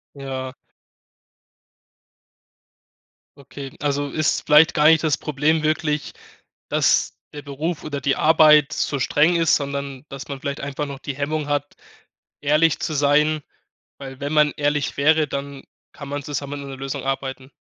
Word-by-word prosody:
Ja. 130 -2 -6 2.8
Okay. 140 0 -9
Also, 145 -1 -1
ist 155 +2 0
vielleicht 150 +2 +6
gar 150 - +2
nicht 160 0 +6
das 155 -4 +2
Problem 150 +2 0
wirklich, 155 -1 -1 0.6
dass - - +2 0.2
der 145 - -8
Beruf 150 +4 -4
oder 145 -2 -4
die 135 +1 0
Arbeit 155 -1 +5
so 140 - -1
streng 150 +7 +2
ist, 165 -2 +3
sondern 140 -1 -5
dass 135 0 -9
man 140 -2 -6
vielleicht 140 +1 -4
einfach 140 +1 -4
noch 140 -1 -7
die 140 - -6
Hemmung 150 +1 -2
hat, 145 0 -2 0.7
ehrlich 150 +2 +2
zu 155 - -2
sein, 150 +2 +2 0.6
weil 135 -1 -9
wenn 145 +2 -3
man 150 -1 +4
ehrlich 145 -1 -1
wäre, 155 +1 +3
dann 140 0 -6 0.3
kann 140 -2 -10
man 145 0 -4
zusammen 140 0 -5
an 140 - -8
'ner 135 - -7
Lösung 135 0 -5
arbeiten? 135 0 -4
145 Hz, 150 wpm, -22 LUFS, 140-150 Hz, 2.8 s, vielleicht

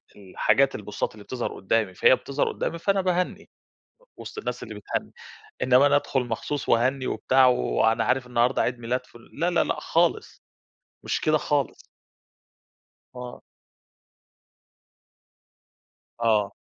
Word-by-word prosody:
الحاجات 105 +7 +1
البوستات 105 -1 -4
اللي 105 -1 -13
بتظهر 125 +1 -4
قدّامي، 100 0 0
فهي 130 - +5
بتظهر 140 +2 -2
قدّامي، 170 - -3
فأنا 195 +2 +1
باهنّي 180 -1 -1 0.7
وسط - - -9
الناس 435 - -4
اللي - - -7
بتهنّي، - - -4 0.5
إنّما 130 +2 +5
أنا 145 - +4
أدخل 140 -2 0
مخصوص 120 +5 -4
وأهنّي 130 +3 +2
وبتاع، 130 0 +3
وأنا 115 -2 +2
عارف 130 -1 0
النهارده 120 0 +2
عيد 125 0 -1
ميلاد، 125 +2 -3
فُ - - -18 0.2
لأ، 170 +4 0
لأ، 175 - +2
لأ - - -2
خالص، - - 0 0.6
مش - - -2
كده 155 0 +3
خالص. 145 -2 -1 1.4
آه. 125 -1 -8 2.8
آه. 105 -3 +2
125 Hz, 125 wpm, -25 LUFS, 115-145 Hz, 2.8 s, فهي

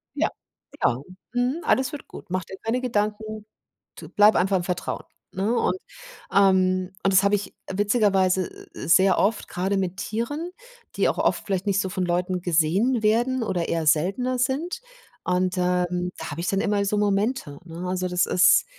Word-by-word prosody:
Ja. - - +1 0.5
Genau. 125 +4 0 0.3
Mhm. 250 +7 0
Alles 260 0 +2
wird 295 - -8
gut. - - -11
Mach 185 0 -1
dir 190 - -10
keine 240 +3 0
Gedanken. 215 -2 -2 0.5
T - - -10
bleibe 210 +1 +5
einfach 190 +1 +2
im - - -3
Vertrauen, 180 -1 -3 0.3
ne? 200 +5 0
Und, - - 0 0.6
ähm 185 -1 +3
und 195 - +2
das 185 - +6
habe 200 +1 +3
ich 200 -1 -3 0.2
witzigerweise 195 -3 +2 0.2
s - - -7
s - - +8
sehr 190 -1 +4
oft 210 +3 +1
grade 195 +2 -1
mit 185 0 -2
Tieren, 290 - -3 0.5
die - - +3
auch - - 0
oft - - 0
vielleicht 195 -1 -1
nicht 200 -1 +2
so 190 - -2
von 185 0 -2
Leuten 180 +1 -1
gesehen 185 +9 +2
werden 240 +4 +2
oder 185 -5 -1
eher 165 -2 -1
seltener 195 +12 +1
sind. 290 - -1 0.5
Und, 180 0 +1
ähm, 180 0 0
da - - -6
habe 155 +3 -5
ich 175 - -3
dann 195 -1 +1
immer 205 0 +1
so 210 +1 0
Momente, 205 - 0
ne? 170 +1 -8
Also, 185 0 -1
das 180 0 +1
ist, 185 - +5
195 Hz, 180 wpm, -24 LUFS, 180-220 Hz, 0.6 s, s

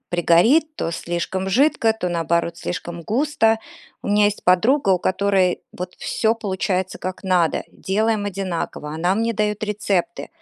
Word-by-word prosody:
пригорит, 200 - +3
то - - -2
слишком 175 +3 -3
жидко, 240 -1 +3
то 220 -5 -3
наоборот 170 0 0
слишком 175 -1 -5
густо. 225 - +1 0.4
У - - -5
меня 210 0 +4
есть 205 - -2
подруга, 200 +6 +3
у 185 - +3
которой 190 -1 +1
вот 180 0 -7
всё 220 0 0
получается 190 -3 -2
как 185 0 -5
надо, 180 -3 +2
делаем 215 +2 0
одинаково, 185 -6 -4
она 175 +4 +1
мне 230 +2 0
дает 210 0 -1
рецепты. 200 -4 -2
190 Hz, 145 wpm, -21 LUFS, 175-220 Hz, 0.4 s, меня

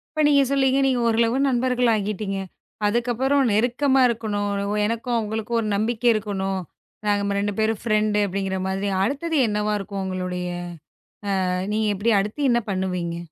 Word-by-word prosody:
இப்போ 310 - +1
நீங்கச் 280 -2 +4
சொல்லுங்க. 270 -1 +3
நீங்க 255 -2 +1
ஒரு 225 - +1
அளவு 235 +2 +2
நண்பர்களாகிட்டீங்க. 220 -6 0 0.5
அதுக்கப்புறம் 245 +5 +1
நெருக்கமா 255 +5 +2
இருக்கணும். 210 -3 -2 0.4
எனக்கும் 230 +2 -2
அவங்களுக்கும் 220 +1 -2
ஒரு 215 - -2
நம்பிக்கை 225 +3 0
இருக்கணும். 195 -2 -2 0.5
நாங்க 200 -1 +1
2 205 0 -1
பேரும் 220 -1 +1
ஃப்ரெண்டு 215 -2 +1
அப்படிங்கற 190 0 -2
மாதிரி. 195 +1 -1
அடுத்தது 295 +7 -1
என்னவா 210 0 0
இருக்கும்? 195 0 -5
உங்களுடைய 180 -1 -3 1.0
அ, - - 0 0.2
நீங்க 215 0 +1
எப்படி 225 +4 +1
அடுத்து 235 +8 -1
என்ன 235 0 +2
பண்ணுவீங்க? 180 -3 -2
215 Hz, 140 wpm, -23 LUFS, 200-245 Hz, 1.0 s, நீங்கச்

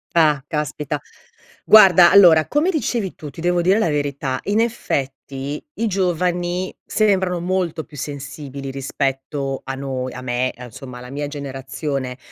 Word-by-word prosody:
Ah, 150 -4 +4
caspita. 150 -1 -3 0.6
Guarda, 185 -5 +8
allora, 170 -6 +7
come 305 +6 +2
dicevi 235 - -1
tu, 150 - -9
ti 145 - -10
devo 175 0 +2
dire 185 +4 +3
la 220 -6 +2
verità, 140 -3 -2
in 205 +2 +1
effetti 140 - -3
i 225 0 -1
giovani 180 -1 -1
sembrano 190 -4 +1
molto 175 -2 -1
più 150 0 -16
sensibili, 140 -1 -6
rispetto 135 0 -3
a 135 - -4
noi 130 -2 -4
a 125 - -7
me, 125 0 -1
a 125 - -9
insomma, 125 +2 -10
alla 125 +1 -10
mia 145 +1 -3
generazione, 135 -2 -4
150 Hz, 145 wpm, -21 LUFS, 135-180 Hz, 0.6 s, Guarda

